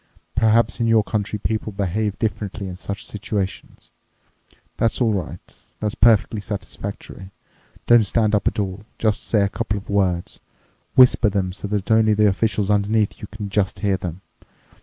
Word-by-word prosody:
Perhaps 115 0 +2
in 115 - +1
your 115 -1 +4
country 105 0 -2
people 110 +1 -2
behave 100 +1 -2
differently 105 -3 -3
in 90 - -6
such 100 +2 -6
situations. 100 -2 -5 0.9
That's 115 - +1
all 115 -4 +2
right. 90 -4 -6 0.2
That's 105 -1 -1
perfectly 110 -1 +3
satisfactory. 100 -1 -7 0.6
Don't 120 -1 +6
stand 110 0 +1
up 105 - +1
at - - 0
all. 100 -1 -3
Just 110 -2 0
say 105 - +1
a - - +2
couple 105 +1 -3
of 100 - -8
words. 90 -4 0 0.6
Whisper 125 -4 +6
them 95 -2 -1
so 100 - -6
that 105 0 -2
only 110 -1 +4
the 105 0 +4
officials 105 0 +1
underneath 105 +1 +1
you 105 - -6
can 105 -1 -7
just 100 -1 -1
hear 100 -2 +2
them. 90 -1 -6
105 Hz, 160 wpm, -22 LUFS, 100-110 Hz, 0.9 s, Don't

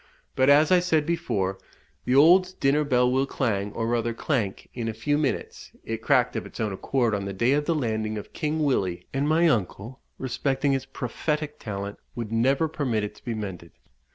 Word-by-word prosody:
But, 130 +1 +3
as 150 +3 +6
I 180 - +7
said 160 -4 +1
before, 115 - -1 0.5
the 125 - +2
old 180 +6 +6
dinner 140 +2 +3
bell 125 -3 +2
will 135 +1 +1
clang, 105 -7 -1
or 115 - -2
rather 115 0 0
clank, 115 -8 -2
in 120 -2 -4
a 110 - -3
few 145 +6 0
minutes 145 -3 -3
it - - -4
cracked - - +2
of - - -2
its - - -12
own 110 -3 -1
accord 120 +3 0
on 100 -1 -2
the 100 - -4
day 115 +7 +2
of 145 +1 +2
the 165 - +1
landing 110 -5 -1
of 105 - -8
King 155 +1 -1
Willie, 95 -11 0
and 140 +2 0
my 165 +2 +4
uncle, 115 - -1 0.2
respecting 135 +2 0
its 135 -1 -1
prophetic 150 +4 -3
talent, 100 -2 -5 0.2
would 115 -3 -5
never 135 +7 +2
permit 130 -8 -1
it 105 - -4
to - - -20
be 120 - -3
mended. 95 -6 -7
130 Hz, 200 wpm, -25 LUFS, 110-150 Hz, 0.5 s, I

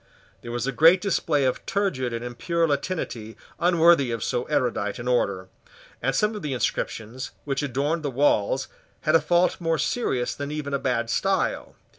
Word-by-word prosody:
There 120 - -7
was 120 0 -2
a 135 - 0
great 165 +8 +6
display 165 -7 +1
of 130 - -1
turgid 140 -12 0
and 115 +1 -4
impure 165 +8 0
Latinity 140 -7 -3 0.2
unworthy 170 -5 +4
of 115 -1 -3
so 125 -1 -1
erudite 105 -5 -1
an 120 0 -6
order; 100 -7 0 0.5
and 135 +2 0
some 210 +8 +2
of 210 - -5
the 145 -3 -3
inscriptions 125 0 -3 0.2
which 140 0 -1
adorned 145 +4 -1
the 145 - -2
walls 130 -1 +1 0.3
had 155 - +1
a 165 - +6
fault 175 +1 +2
more 165 -1 +1
serious 130 - -1
than 145 0 -5
even 150 -1 -4
a 140 - +1
bad 120 -3 -1
style. 195 +6 0
140 Hz, 175 wpm, -25 LUFS, 120-165 Hz, 0.5 s, great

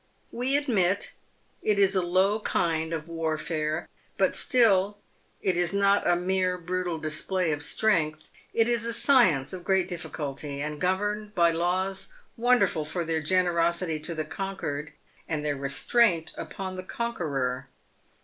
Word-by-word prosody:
"We 255 +4 +1
admit 200 -10 +1 0.5
it 210 -1 +1
is 195 -1 +4
a 190 - +2
low 190 +4 +2
kind 160 -5 0
of 160 -1 -4
warfare, 160 -1 -2 0.3
but - - +2
still 205 -5 +3 0.5
it 185 - +2
is 175 +1 0
not 200 0 +3
a 175 - +4
mere 185 +1 0
brutal 180 -1 -2
display 160 +3 -1
of 145 -1 -2
strength. 155 -3 +1 0.2
It 225 0 +2
is 235 -1 +1
a 235 - 0
science 225 - +4
of 180 -1 -6
great 190 -1 +2
difficulty, 145 -5 -5
and 150 +1 -4
governed 205 +3 -1
by 170 -1 +4
laws 185 - -1 0.2
wonderful 240 -9 +2
for 170 +3 -3
their 160 -1 -1
generosity 170 -1 +1
to 165 +2 -5
the 155 -1 -2
conquered, 155 -7 -4 0.4
and 150 -2 -2
their 145 -1 0
restraint 165 - +2
upon 190 -2 -6
the 185 - -5
conqueror. 140 - -2
180 Hz, 145 wpm, -27 LUFS, 155-200 Hz, 0.5 s, is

